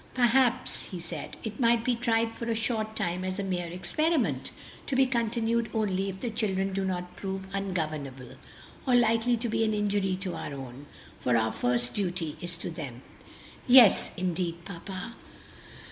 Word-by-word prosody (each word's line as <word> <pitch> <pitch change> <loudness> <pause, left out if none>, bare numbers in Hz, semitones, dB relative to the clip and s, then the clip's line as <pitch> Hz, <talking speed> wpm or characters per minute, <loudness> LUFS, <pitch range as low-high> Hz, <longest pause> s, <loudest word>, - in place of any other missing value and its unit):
"Perhaps," 250 0 +2
he 185 - -5
said, 170 -1 -6
"it 215 -2 -5
might 235 -2 +4
be 250 - +2
tried 230 -1 +1
for 235 - -6
a 230 - +1
short 220 -1 -1
time 180 -3 -1
as 185 0 -2
a 200 - -1
mere 180 -2 -2
experiment, 190 - 0 0.4
to 270 - -1
be 265 0 +5
continued 235 -2 0
only 195 -3 0
if 190 0 -7
the 240 - -2
children 195 -3 0
do 195 0 0
not 180 -1 -3
prove 190 -1 -4
ungovernable, 155 -10 -3 0.6
or 250 - +5
likely 235 0 +4
to 235 +2 -2
be 225 0 +1
an 215 -1 +1
injury 205 -2 +1
to 190 -2 -3
our 140 - -5
own; 135 +1 -9 0.3
for 125 -2 +2
our 110 0 +1
first 120 0 +1
duty 180 -6 -2
is 175 -1 -5
to 175 - -5
them." 135 -6 -7 0.6
"Yes 245 -4 +7
indeed, 175 -2 -2
papa!" 195 +4 -7
195 Hz, 170 wpm, -29 LUFS, 175-230 Hz, 0.6 s, Yes